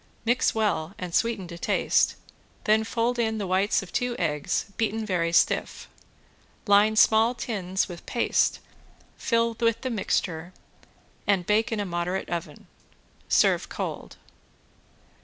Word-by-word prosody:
Mix 240 +1 +2
well 200 -5 -1
and 180 -2 -6
sweeten 225 -4 0
to 170 -1 -8
taste, - - +2 0.5
then 220 -1 +3
fold 235 +2 -1
in 220 -1 0
the 205 - -3
whites 190 +3 +1
of 185 - -13
two 245 -1 -1
eggs 150 -4 -1
beaten 225 -1 -1
very 175 -4 0
stiff. 170 - +1 0.8
Line 205 +1 +4
small 220 +2 +4
tins 190 -6 -2
with 175 -2 -10
paste, 240 - +1 0.6
fill 230 -1 0
with 230 -1 +1
the 260 - -3
mixture 180 -5 -2 0.7
and 195 -3 +2
bake 215 +4 +1
in 225 - -1
a 205 - -1
moderate 180 +1 -3
oven. 160 -4 -5 0.6
Serve - - +3
cold. - - -6
205 Hz, 135 wpm, -26 LUFS, 180-230 Hz, 0.8 s, Line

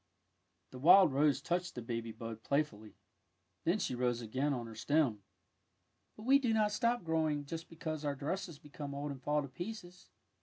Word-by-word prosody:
'^ - - -44
The 130 - -9
wild 175 +2 +7
rose 145 +1 +3
touched 175 +1 -1
the 120 - -4
baby 115 -1 -3
bud 115 0 -7
play 140 +6 +2
fully. 110 -6 -14 0.7
Then 170 +5 +3
she 195 - -2
rose 120 -1 0
again 130 +6 -1
on 125 -4 -2
her 115 - -9
stem. 130 -2 +1 0.5
" - - -46
But 215 - -11
we 270 +4 +6
do 240 -5 +1
not 210 -1 +3
stop 235 +1 +1
growing 155 -3 0
just 165 +3 -6
because 160 -2 -5
our 145 -1 -1
dresses 165 +3 -4
become 145 -1 -8
old 145 +1 -3
and 135 -2 -8
fall 150 +2 +1
to - - -6
pieces. 175 - -8
150 Hz, 195 wpm, -34 LUFS, 125-175 Hz, 0.7 s, wild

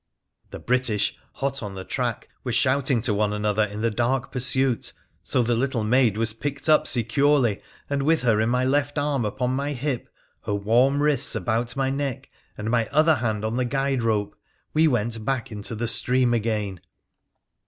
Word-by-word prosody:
The - - -7
British, 120 -4 +1 0.2
hot 135 0 -3
on 100 -3 -6
the 95 - -6
track, - - -3 0.2
were - - -3
shouting 130 -2 +2
to 110 -1 0
one 105 0 +1
another 105 0 +1
in 105 +1 -6
the 115 0 +1
dark 120 +4 -1
pursuit, 130 -2 0 0.3
so 125 - +1
the 120 +1 +1
little 120 -1 0
maid 115 -1 +3
was 110 0 0
picked 145 +6 -4
up 155 0 +4
securely, 125 -1 +2 0.3
and, 140 -1 -1
with 155 0 +2
her 110 -3 +3
in 110 - +1
my 125 +1 +1
left 145 +2 0
arm 145 -4 0
upon 125 +4 -1
my 140 +3 -1
hip, 135 -1 -3 0.4
her 100 - -1
warm 125 +8 +2
wrists 150 -6 +2
about 115 +4 -1
my 135 -1 0
neck, 140 -2 -4 0.3
and 110 +2 -3
my 115 -2 +2
other 155 +1 +3
hand 110 -3 -2
on 110 +2 -2
the 125 - +1
guide 135 0 0
rope, 110 -3 0 0.4
we 160 +1 +4
went 115 -4 -1
back 125 -1 -2
into 105 +2 -5
the 115 +2 -2
stream 125 +1 +2
again. 105 -5 -1
120 Hz, 185 wpm, -24 LUFS, 110-135 Hz, 0.4 s, up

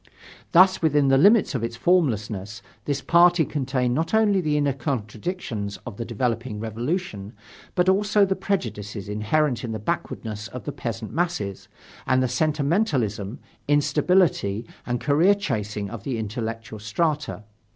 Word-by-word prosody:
Thus, 185 +2 +6
within 145 -4 +3
the 135 - +5
limits 205 +3 +5
of 125 -4 -2
its 115 0 -3
formlessness, 110 - 0 0.2
this 140 -1 -1
party 175 -1 +5
contained 130 -4 -1
not 165 +9 0
only 205 -3 +3
the 150 -3 0
inner 145 -2 +1
contradictions 115 - -4
of 115 -5 -7
the 115 - -4
developing 115 -1 -2
Revolution, 115 - -3 0.4
but 180 0 +2
also 205 +2 +4
the 190 0 0
prejudices 105 - -3
inherent 120 +6 0
in 115 -2 -3
the - - -2
backwardness 105 0 -4
of 125 - -8
the 145 - -4
peasant 115 -4 -5
masses, 160 - -2 0.4
and 130 0 +3
the - - +2
sentimentalism, 140 - 0 0.3
instability 145 - +2 0.2
and 120 0 -1
career 160 - +4
chasing 105 - -3
of 115 -3 -6
the 130 -4 -2
intellectual 110 0 -5
strata. 150 +3 -1
130 Hz, 140 wpm, -24 LUFS, 110-165 Hz, 0.4 s, Thus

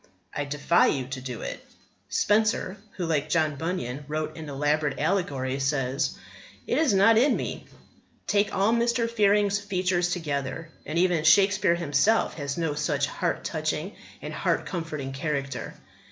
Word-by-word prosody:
I 145 - -1
defy 150 +4 +3
you 130 -3 0
to 130 -1 -5
do 125 -3 -6
it. - - -6 0.5
Spenser, 210 -1 +1 0.2
who, 180 - -2
like 155 -2 0
John 155 -3 +1
Bunyan, 145 -4 -3
wrote 155 +1 -3
an 160 -2 -7
elaborate 145 +1 0
allegory, 140 -6 -1
says: 135 0 0 0.5
It - - +1
is 315 -4 +3
not 200 +3 +5
in 275 +5 +4
me. - - -5 0.6
Take 205 0 +2
all 200 +4 +2
Mr. 235 0 +1
Fearing's 205 -2 +3
features 185 -3 0
together, 155 -2 -3 0.2
and 155 - -2
even 175 -3 +2
Shakespeare 195 +2 +5
himself 170 +6 +2
has 140 +1 -3
no 165 -3 0
such 145 -1 0
heart 170 +4 -2
touching 155 +4 -3 0.3
and - - -5
heart - - 0
comforting 155 -7 -4
character. 140 -2 -3
160 Hz, 150 wpm, -26 LUFS, 145-195 Hz, 0.6 s, not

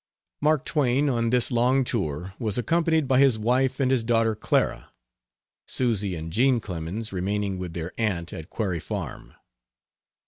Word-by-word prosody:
Mark 150 -1 +2
Twain, 140 -1 +2
on 115 -3 +1
this 125 +2 +2
long 125 +3 +3
tour, 95 - -3
was 110 -2 -1
accompanied 160 +4 +1
by 130 0 +4
his 135 -5 +5
wife 125 +4 +1
and 130 -1 +2
his 130 -3 +2
daughter 115 -1 +2
Clara 110 - 0 0.8
Susy 105 -7 0
and 80 0 -6
Jean 125 +2 +3
Clemens 95 +3 -5
remaining 100 +1 -1
with 90 -2 -5
their 85 +1 -5
aunt 90 -7 -1
at 80 +3 -8
Quarry 95 -6 -2
Farm. - - -6
115 Hz, 150 wpm, -25 LUFS, 95-130 Hz, 0.8 s, his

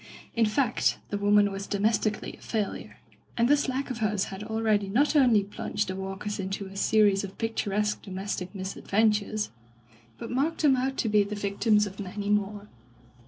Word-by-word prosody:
In 230 -2 +3
fact 235 +2 +1
the 205 - -1
woman 205 0 +4
was 195 0 -5
domestically 215 +1 0
a - - -21
failure, 215 -3 -3 0.4
and 235 0 +3
this 290 0 +3
lack 265 +1 -2
of 245 - -5
hers 210 -2 +1
had 190 +2 -6
already 215 -2 0
not 280 +9 +2
only 245 -8 +5
plunged 205 +1 -3
the 185 - -3
Walkers 195 +2 -5
into 195 +1 -3
a 195 0 -11
series 205 -1 +3
of 195 -1 -7
pictu 225 -2 -2
resque 210 +1 0
domestic 190 -1 -5
misadventures, 210 +2 0 0.7
but 230 - -7
marked 295 +6 0
them 280 -3 +6
out 265 +1 -1
to - - 0
be 210 -1 +4
the 200 +1 -2
victims 210 +1 +2
of 195 0 -9
many 205 +1 -3
more. 205 0 -1
210 Hz, 175 wpm, -27 LUFS, 200-225 Hz, 0.7 s, them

